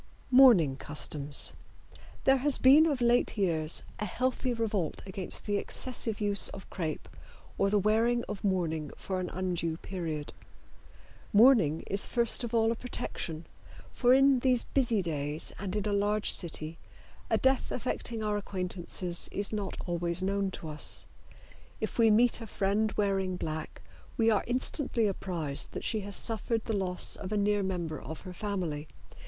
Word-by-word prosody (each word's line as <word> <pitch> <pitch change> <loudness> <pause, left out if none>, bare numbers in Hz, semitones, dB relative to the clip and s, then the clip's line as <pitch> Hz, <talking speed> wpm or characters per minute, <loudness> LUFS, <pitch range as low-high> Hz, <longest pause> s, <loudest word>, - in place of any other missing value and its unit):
MOURNING 225 - +6
CUSTOMS. 145 -1 -1 0.7
There 270 0 +5
has 275 +1 +2
been 290 +5 +6
of 280 -5 -1
late 240 -1 +2
years 165 -5 +1 0.2
a 210 - -2
healthy 255 +5 -1
revolt 215 -8 -2
against 190 -1 -5
the 205 -1 0
excessive 230 0 -1
use 205 -2 +6
of 190 - -10
crepe 160 -5 -4 0.5
or 195 - +3
the 205 - +2
wearing 225 +4 +2
of 210 -2 -6
mourning 165 -6 -1
for 190 -1 -4
an 180 - -3
undue 175 -3 -2
period. 165 -6 -5 1.0
Mourning 210 - +5
is 200 0 -1
first 235 0 +3
of 235 - -4
all 225 -1 +3
a - - -1
protection, 170 -9 -4 0.5
for 245 -1 +2
in 270 0 +5
these 250 -1 +2
busy 235 -7 0
days 150 -2 -3
and 195 0 -4
in 210 -1 -1
a 210 - 0
large 205 +1 +1
city 160 -2 0 0.5
a - - +3
death 265 0 +1
affecting 235 -2 -3
our 210 -1 0
acquaintances 180 -2 -3
is 200 +2 -3
not 205 -3 -3
always 175 0 -1
known 200 0 0
to 170 - -8
us. 150 -1 -1 0.7
If - - -4
we 225 -1 +6
meet 235 +2 +3
a 225 - -7
friend 210 +2 0
wearing 195 -3 0
black 155 -2 -5 0.3
we 225 -1 +4
are 210 - +2
instantly 250 -1 -1
apprised 175 -8 -3
that - - -5
she 220 - -1
has 200 -1 -4
suffered 225 0 -1
the 225 - -1
loss 185 -2 0
of 195 0 -7
a 210 - 0
near 205 0 +2
member 175 -5 -3
of 160 - -8
her 185 -1 -9
family. 180 -7 -3
200 Hz, 160 wpm, -30 LUFS, 175-230 Hz, 1.0 s, MOURNING